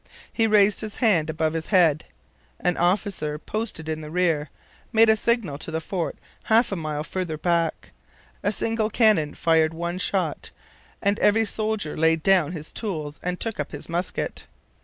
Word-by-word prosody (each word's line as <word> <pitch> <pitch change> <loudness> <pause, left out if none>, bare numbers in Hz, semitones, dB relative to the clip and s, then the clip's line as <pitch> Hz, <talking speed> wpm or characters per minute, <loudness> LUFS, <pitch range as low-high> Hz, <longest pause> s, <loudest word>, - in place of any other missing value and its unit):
He 225 -1 +2
raised 210 -1 +4
his 215 -2 -6
hand 185 - +2
above 160 0 0
his 165 -1 -3
head. 165 -6 +3 0.5
An 180 -1 +1
officer, 175 -4 0
posted 210 -2 -4
in 155 0 -3
the 150 - -8
rear, 165 -3 +1 0.4
made 225 -1 +5
a 220 - +6
signal 220 - 0
to 160 - -4
the 160 0 -2
fort 170 0 -3 0.3
half 225 +1 +3
a - - 0
mile 155 -3 -3
farther 170 -1 -4
back. 165 - -1 0.5
A 205 - +1
single 220 0 -1
cannon 210 -10 +3
fired 160 -1 +2
one 170 +2 -3
shot; 185 -5 -1 0.5
and 200 +1 +2
every 220 +2 +4
soldier 215 -6 -2
laid 160 0 +2
down 185 -6 +4
his 155 -3 -7
tools 155 -9 -4
and 180 0 -3
took 225 -2 -4
up - - -4
his - - -5
musket. 175 +2 -3
175 Hz, 170 wpm, -24 LUFS, 160-210 Hz, 0.5 s, a